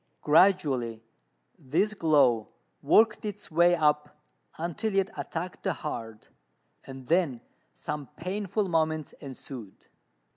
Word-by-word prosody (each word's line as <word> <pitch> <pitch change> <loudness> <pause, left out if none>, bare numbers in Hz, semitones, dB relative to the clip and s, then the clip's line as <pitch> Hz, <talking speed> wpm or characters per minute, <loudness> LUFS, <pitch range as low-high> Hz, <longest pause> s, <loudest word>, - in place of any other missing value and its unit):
Gradually 145 - +3 0.6
this 180 +11 0
glow 140 - +3 0.3
worked 220 0 +4
its 205 -2 -6
way 175 +2 +5
up 150 -2 +1 0.4
until 195 +6 -2
it 195 +2 +1
attacked 175 +2 -5
the 190 - 0
heart, 115 -6 -7 0.5
and 135 -1 -10
then 160 -5 +1 0.4
some 150 -2 -5
painful 200 +3 -2
moments 160 -3 0
ensued. 130 -6 -9
160 Hz, 105 wpm, -28 LUFS, 135-185 Hz, 0.6 s, way